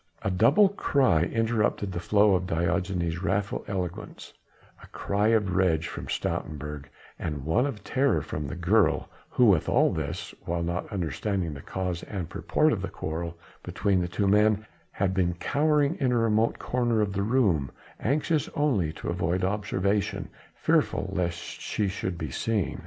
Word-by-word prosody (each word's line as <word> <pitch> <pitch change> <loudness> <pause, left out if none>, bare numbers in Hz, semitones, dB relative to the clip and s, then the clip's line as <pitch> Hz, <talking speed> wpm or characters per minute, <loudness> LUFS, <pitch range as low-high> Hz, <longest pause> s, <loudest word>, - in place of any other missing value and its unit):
A 100 - 0
double 135 - +5
cry 135 - +2
interrupted 110 -2 0
the 85 - -3
flow 100 +4 +4
of 90 -1 0
Diogenes' 85 0 -1
wrathful 100 +1 -1
eloquence: 90 -3 -5 0.5
a - - -13
cry 100 +1 -1
of 105 -5 +2
rage 85 -4 +2
from - - -7
Stoutenburg 75 -1 -3 0.3
and 75 -4 -4
one 115 - +2
of 115 -7 -6
terror 130 - +1
from 75 -1 -4
the 70 - -5
girl, 85 -2 +2 0.2
who 115 -6 +5
all 75 - +2
this - - -4
while 85 0 -2
not 85 +5 -3
understanding 90 - -2
the 70 - -8
cause 90 0 -3
and 90 -5 -5
purport - - +1
of - - -2
the - - -3
quarrel 85 +2 -5 0.2
between 100 -3 0
the 90 - -1
two 100 +3 -1
men 105 +1 +3 0.2
had 95 -1 -1
been 90 -2 +1
cowering 145 - +2
in 130 -2 +2
a 120 - +2
remote 115 0 +2
corner 120 -2 0
of 100 -2 0
the 100 - -1
room 100 - +2 0.3
anxious 150 +4 0
only 120 - +1
to - - -8
avoid 90 +1 0
observation, 100 0 -1 0.3
fearful - - +1
lest 85 -1 -1
she 105 +3 -3
should 95 -1 -3
be 80 -4 -4
seen. 105 +4 -1
95 Hz, 160 wpm, -27 LUFS, 85-110 Hz, 0.5 s, double